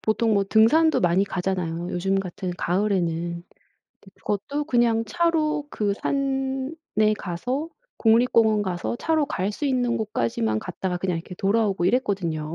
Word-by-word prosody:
보통 220 Hz, +1 st, +1 dB
뭐 200 Hz, -1 st, +2 dB
등산도 230 Hz, +11 st, +4 dB
많이 180 Hz, +2 st, +3 dB
가잖아요 180 Hz, -3 st, -3 dB
요즘 195 Hz, +2 st, 0 dB
같은 185 Hz, 0 st, -5 dB
가을에는. 175 Hz, -3 st, -1 dB, 0.6 s
근데 195 Hz, -, -17 dB
그것도 280 Hz, +9 st, -3 dB
그냥 235 Hz, -4 st, +2 dB
차로 315 Hz, -4 st, 0 dB
그 205 Hz, -2 st, -1 dB
산에 270 Hz, -2 st, -1 dB
가서 250 Hz, -, -3 dB, 0.3 s
국립공원 225 Hz, -2 st, +4 dB
가서 185 Hz, +4 st, -3 dB
차로 315 Hz, +1 st, +1 dB
갈 195 Hz, -2 st, -2 dB
수 295 Hz, -, -5 dB
있는 250 Hz, -3 st, +1 dB
곳까지만 115 Hz, -, -1 dB
갔다가 180 Hz, -, -4 dB
그냥 180 Hz, -1 st, -1 dB
이렇게 180 Hz, +2 st, -9 dB
돌아오고 200 Hz, -2 st, +1 dB
이랬거든요. 180 Hz, -9 st, 0 dB
210 Hz, 320 characters per minute, -24 LUFS, 180-260 Hz, 0.6 s, 등산도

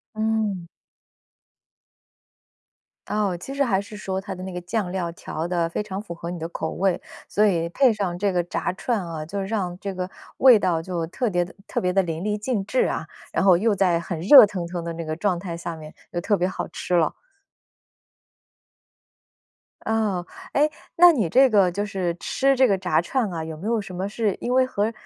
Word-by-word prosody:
嗯。 215 Hz, -5 st, -1 dB, 2.4 s
哦， 205 Hz, -4 st, 0 dB
其 270 Hz, -, -7 dB
实 280 Hz, 0 st, +2 dB
还 195 Hz, -5 st, +1 dB
是 210 Hz, +1 st, -9 dB
说 190 Hz, -2 st, -3 dB
它 195 Hz, -1 st, -6 dB
的 185 Hz, -, -9 dB
那 190 Hz, -, -6 dB
个 180 Hz, -, -4 dB
酱 180 Hz, +1 st, -2 dB
料 180 Hz, -3 st, -2 dB
调 165 Hz, 0 st, -5 dB
得 170 Hz, -2 st, 0 dB
非 170 Hz, -, -2 dB
常 195 Hz, -2 st, -5 dB
符 190 Hz, -5 st, -7 dB
合 170 Hz, 0 st, -6 dB
你 175 Hz, -, -5 dB
的 165 Hz, 0 st, -4 dB
口 160 Hz, -1 st, -4 dB
味， 190 Hz, -2 st, 0 dB, 0.3 s
所 210 Hz, -, +2 dB
以 170 Hz, -4 st, +1 dB
配 255 Hz, +3 st, +4 dB
上 195 Hz, -5 st, -2 dB
这 200 Hz, 0 st, +1 dB
个 175 Hz, -1 st, +1 dB
炸 175 Hz, -, -2 dB
串 220 Hz, -1 st, -1 dB
啊， 160 Hz, -2 st, -5 dB
就 200 Hz, +5 st, -4 dB
让 190 Hz, -3 st, -2 dB
这 195 Hz, -1 st, -4 dB
个 185 Hz, 0 st, -3 dB, 0.3 s
味 255 Hz, -4 st, +7 dB
道 175 Hz, -4 st, +1 dB
就 170 Hz, -2 st, -3 dB
特 240 Hz, +7 st, -2 dB
别 175 Hz, -1 st, +1 dB
地 175 Hz, -, -13 dB
特 -, -, -2 dB
别 180 Hz, 0 st, 0 dB
地 195 Hz, 0 st, +3 dB
淋 165 Hz, -1 st, -4 dB
漓 210 Hz, +1 st, 0 dB
尽 210 Hz, -2 st, -2 dB
致 255 Hz, -, +2 dB
啊。 -, -, -3 dB, 0.3 s
然 -, -, +1 dB
后 185 Hz, -3 st, +7 dB
又 215 Hz, +3 st, +2 dB
在 185 Hz, -3 st, +2 dB
很 170 Hz, -1 st, -5 dB
热 210 Hz, -, +9 dB
腾 185 Hz, -4 st, -4 dB
腾 170 Hz, -1 st, -5 dB
的 170 Hz, -, -3 dB
那 165 Hz, 0 st, -6 dB
个 155 Hz, 0 st, -3 dB
状 185 Hz, 0 st, 0 dB
态 170 Hz, -2 st, -5 dB
下 170 Hz, 0 st, -5 dB
面 155 Hz, -1 st, -11 dB, 0.2 s
又 175 Hz, -, -2 dB
特 205 Hz, +3 st, +1 dB
别 180 Hz, -, +1 dB
好 185 Hz, -, -4 dB
吃 180 Hz, -, -4 dB
了。 165 Hz, -3 st, +3 dB, 2.7 s
哦， 210 Hz, -5 st, 0 dB, 0.3 s
诶， 300 Hz, +2 st, +3 dB, 0.3 s
那 350 Hz, +1 st, +9 dB
你 230 Hz, -, +1 dB
这 265 Hz, +9 st, +6 dB
个 200 Hz, -6 st, +4 dB
就 205 Hz, +3 st, -2 dB
是 185 Hz, -4 st, -2 dB
吃 275 Hz, 0 st, +2 dB
这 260 Hz, -1 st, +4 dB
个 195 Hz, -, +3 dB
炸 180 Hz, -3 st, +1 dB
串 220 Hz, +4 st, -1 dB
啊， 165 Hz, -2 st, -3 dB
有 160 Hz, -1 st, -6 dB
没 180 Hz, -, -8 dB
有 225 Hz, -1 st, +1 dB
什 190 Hz, -2 st, -8 dB
么 190 Hz, -, -2 dB
是 210 Hz, -2 st, -1 dB
因 245 Hz, -, -2 dB
为 260 Hz, 0 st, +4 dB
和 220 Hz, -2 st, -1 dB
190 Hz, 225 characters per minute, -24 LUFS, 175-215 Hz, 2.7 s, 热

